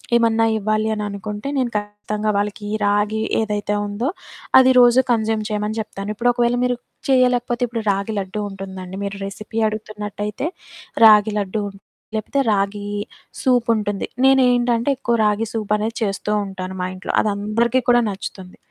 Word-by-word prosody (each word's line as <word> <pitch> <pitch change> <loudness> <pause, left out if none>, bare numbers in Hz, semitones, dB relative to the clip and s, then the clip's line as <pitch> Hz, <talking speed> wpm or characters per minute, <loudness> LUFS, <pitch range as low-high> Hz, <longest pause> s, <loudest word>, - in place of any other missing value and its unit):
ఏమన్నా 225 -1 +3
ఇవ్వాలి 215 +1 0
అని 210 - -3
అనుకుంటే, 205 +3 -6
నేను 250 -3 0
ఖచ్చితంగా 210 +1 -3
వాళ్ళకి 205 +1 -2
ఈ - - -2
రాగి 205 +2 +1 0.2
ఏదైతే 210 -1 -1
ఉందో, 220 +7 -2 0.5
అది 260 0 +6
రోజు 245 +1 +6
కన్జ్యూమ్ 220 -2 0
చేయమని 210 +1 -2
చెప్తాను. 200 -1 -7
ఇప్పుడు 245 +3 +2
ఒకవేళ 240 0 +1
మీరు 245 -1 0 0.3
చేయలేకపోతే, 250 -2 +2
ఇప్పుడు 230 -1 -4
రాగి 200 +2 -2
లడ్డూ 195 +2 -4
ఉంటుందండి. 190 -1 -8
మీరు 200 0 -5
రెసిపీ 215 +3 -5
అడుగుతున్నట్టయితే, 210 +2 -5 0.6
రాగి 210 0 +7
లడ్డూ 205 +1 -2 0.5
లేకపోతే, 245 +6 -1
రాగి 205 0 -1 0.6
సూపుంటుంది. 230 -5 +1 0.2
నేను 270 0 +6
ఏంటంటే, 240 +1 +1
ఎక్కువ 235 -2 +1
రాగి 210 +2 +1
సూపనేది 215 +1 -1
చేస్తూ 200 0 -2 0.2
ఉంటాను 190 -1 -6
మా - - -1
ఇంట్లో. 185 - -5
అది 210 - 0
అందరికి 230 +5 +1
కూడా 240 0 +6
నచ్చుతుంది. 190 -1 -7
215 Hz, 145 wpm, -21 LUFS, 205-235 Hz, 0.6 s, రాగి